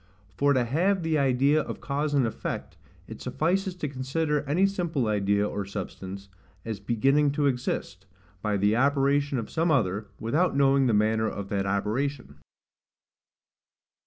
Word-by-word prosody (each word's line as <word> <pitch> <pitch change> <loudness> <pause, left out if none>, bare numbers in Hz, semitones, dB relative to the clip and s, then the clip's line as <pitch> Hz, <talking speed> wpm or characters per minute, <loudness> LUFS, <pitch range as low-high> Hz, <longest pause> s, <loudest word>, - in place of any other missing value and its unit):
For 145 +7 +3
to 130 -2 +2
have 175 +9 +1
the 160 -2 +1
idea 140 +3 +3
of - - -6
cause 145 +1 -2
and 135 -3 +3
effect, 110 - -4 0.3
it - - -9
suffices 185 +3 -1
to 165 -4 -3
consider 145 +3 -1
any 175 +7 +3
simple 175 -9 -1
idea 100 -1 +1
or 100 - -3
substance, 100 0 -7 0.4
as 110 -3 -4
beginning 135 +7 +2
to 145 0 0
exist, 125 -8 -2 0.3
by 105 -1 0
the 105 +2 +2
operation 140 +1 +2
of 115 - -5
some 165 +1 +1
other, 105 - +1
without 150 +9 +1
knowing 135 -1 +4
the 115 - +2
manner 110 +1 +2
of 100 -1 -6
that 100 -1 -1
operation. 105 - -2
135 Hz, 150 wpm, -27 LUFS, 105-150 Hz, 0.4 s, knowing